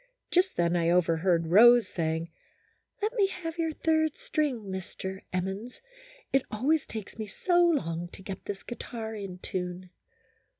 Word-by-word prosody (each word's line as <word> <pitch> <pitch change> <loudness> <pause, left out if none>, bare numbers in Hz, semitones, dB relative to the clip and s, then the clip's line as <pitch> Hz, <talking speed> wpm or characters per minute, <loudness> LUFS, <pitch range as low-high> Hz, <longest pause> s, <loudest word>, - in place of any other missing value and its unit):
Just 370 +2 +3
then 170 0 +2
I 170 -1 +2
overheard 170 0 +3
Rose 240 +4 +8
saying, 165 0 -2 0.3
" - - -42
Let 435 +3 +1
me 415 -5 +3
have 340 -3 -6
your 325 -1 +1
third 315 -1 +1
string, 290 -7 -1
Mr. 190 0 -6
Emmons, 190 +6 -3 0.5
it 270 - +5
always 280 +8 +1
takes 220 0 -7
me 215 - -3
so 350 - +2
long 175 - +1
to 190 - -11
get 195 0 -7
this 200 -1 -5
guitar 230 -2 -6
in 195 -4 -6
tune." 180 0 -5
205 Hz, 155 wpm, -29 LUFS, -, 0.5 s, Rose